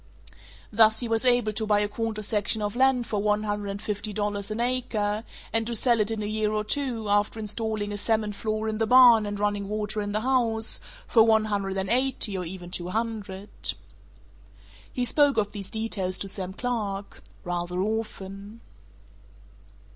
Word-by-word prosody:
Thus 220 +1 +5
he 240 - -2
was 225 +2 +2
able 245 -3 +3
to 220 +1 -2
buy 205 -1 +3
a 205 - +1
quarter 215 0 -3
section 210 0 0
of 205 +1 -2
land 260 -1 +3
for 210 -3 -2
one 210 0 +1
hundred 205 -1 -3
and 200 0 -4
fifty 210 0 -3
dollars 205 0 -2
an 215 +1 -4
acre, 225 -4 -1 0.3
and 225 0 +2
to 235 - -3
sell 235 +1 +3
it 210 0 +2
in 220 -1 -3
a - - -3
year 215 0 -1
or 215 0 -1
two, 235 -2 -2
after 205 +2 +1
installing 215 -1 -2
a 205 - -3
cement 215 0 0
floor 215 +1 -2
in 215 0 -2
the 225 - +1
barn 240 -4 +7
and 205 0 -4
running 205 -1 -1
water 210 0 -2
in 205 0 -3
the 215 +1 -1
house, 230 -3 +2 0.3
for 230 - +4
one 220 -1 +4
hundred 200 -2 -2
and 190 +2 -1
eighty 250 -4 +2
or 185 - -2
even 175 0 -6
two 175 -1 -2
hundred. 210 -2 -4 1.4
He 250 - -1
spoke 285 +2 +3
of 205 -1 +1
these 200 -2 -7
details 200 -4 -2
to 195 - -5
Sam 190 -1 -3
Clark... 205 -4 -4 0.2
rather 175 0 -3
often. 205 0 -4
215 Hz, 185 wpm, -26 LUFS, 205-225 Hz, 1.4 s, barn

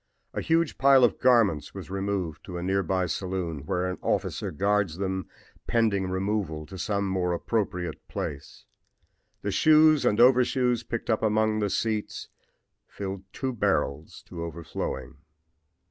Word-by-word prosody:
A - - -2
huge 165 -1 +1
pile 135 -1 +6
of 120 - +3
garments 115 - +3
was - - -8
removed 95 -5 -3
to 90 - -6
a 85 - -4
near 95 +2 +1
by 95 +1 0
saloon, 85 -4 -3
where 90 0 0
an 90 0 -3
officer - - -1
guards 100 -1 0
them 95 -2 -3 0.4
pending 105 -5 +1
removal 95 -5 -2
to 95 - -10
some 100 0 -1
more 90 -2 0
appropriate 90 -3 -2
place. 70 -1 -6 0.8
The 105 - -1
shoes 155 +3 +5
and 115 -4 +2
overshoes 125 -1 +4
picked 115 0 -3
up 110 - +1
among 110 0 +2
the 105 -1 0
seats 110 +1 -2 0.6
fill 95 -1 -6
two 130 -1 -3
barrels 75 - -1
to 85 -2 -7
overflowing. 85 -4 -5
100 Hz, 145 wpm, -27 LUFS, 90-115 Hz, 0.8 s, pile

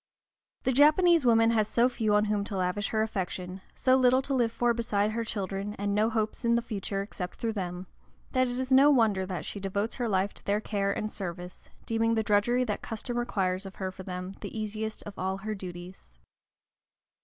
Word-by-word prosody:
The 260 - +2
Japanese 310 +3 +5
woman 225 -1 +5
has 215 -2 +2
so 240 +2 +3
few 220 -4 0
on 210 0 +4
whom 210 -1 0
to 200 - -4
lavish 185 +2 0
her 220 -1 +1
affection, 185 -3 -4
so 255 0 +3
little 260 0 +4
to 275 - -2
live 240 -3 +2
for 240 +1 +1
beside 215 -3 0
her 230 +1 -2
children, 200 -1 -3
and 205 0 -2
no 215 +2 +3
hopes 220 0 -2
in 235 0 +3
the 235 - +1
future 200 -3 -3
except 185 -3 -6
through 230 -1 -2
them, 180 -2 -4 0.5
that 255 -1 +2
it 245 +1 -3
is 260 +1 -3
no 270 +2 +7
wonder 215 -9 +3
that 180 -5 -4
she 205 - -5
devotes 200 +3 -2
her 240 -3 -1
life 195 0 +1
to - - -14
their 205 +1 +1
care 200 -2 -1
and 215 +2 -3
service, 180 -1 -7 0.2
deeming 225 0 +1
the 220 - +1
drudgery 215 +5 +2
that 215 -4 -3
custom 230 +2 -5
requires 195 -6 -1
of 195 -1 -8
her 190 -1 -3
for 190 - -10
them 185 0 -6
the - - -6
easiest 215 +1 -4
of 205 -2 -9
all 190 +1 -1
her 215 +2 -4
duties. 175 - -9
210 Hz, 210 wpm, -29 LUFS, 195-235 Hz, 0.5 s, no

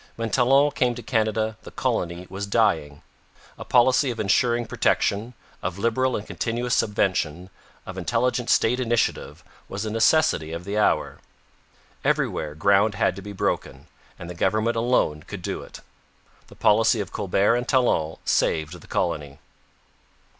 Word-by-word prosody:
When 115 -1 -4
Talon 135 +4 +4
came 125 -3 0
to 120 - -8
Canada, 110 -1 0
the - - -11
colony 85 +1 -2
was 95 +2 -5
dying. 75 -7 0 0.5
A - - -8
policy 130 +2 +3
of 115 -2 -5
ensuring 120 +3 +2
protection, 110 +1 0 0.3
of 90 0 -4
liberal 120 +4 +1
and 105 - -4
continuous 120 +2 -2
subvention, 95 -5 0 0.3
of 95 0 -7
intelligent 120 +5 0
state 125 +3 +3
initiative, 120 -4 -1 0.3
was 100 +2 -4
a 110 - -3
necessity 115 - +2
of 85 +1 -5
the 100 +3 -4
hour. 105 - +1 0.8
Everywhere 75 -1 -1
ground 100 +4 +3
had 95 - +1
to 100 - -8
be 105 +1 -8
broken, 100 - -3 0.3
and 85 - -9
the 90 - -6
government 110 +6 0
alone 115 -10 +1
could - - -9
do - - -3
it. - - -12 0.7
The - - -15
policy 110 +2 +3
of 100 -3 -4
Colbert 100 +2 +1
and 120 0 -2
Talon 100 - +1
saved 80 +2 0
the - - -16
colony. 70 -2 -2
110 Hz, 150 wpm, -24 LUFS, 90-120 Hz, 0.8 s, Talon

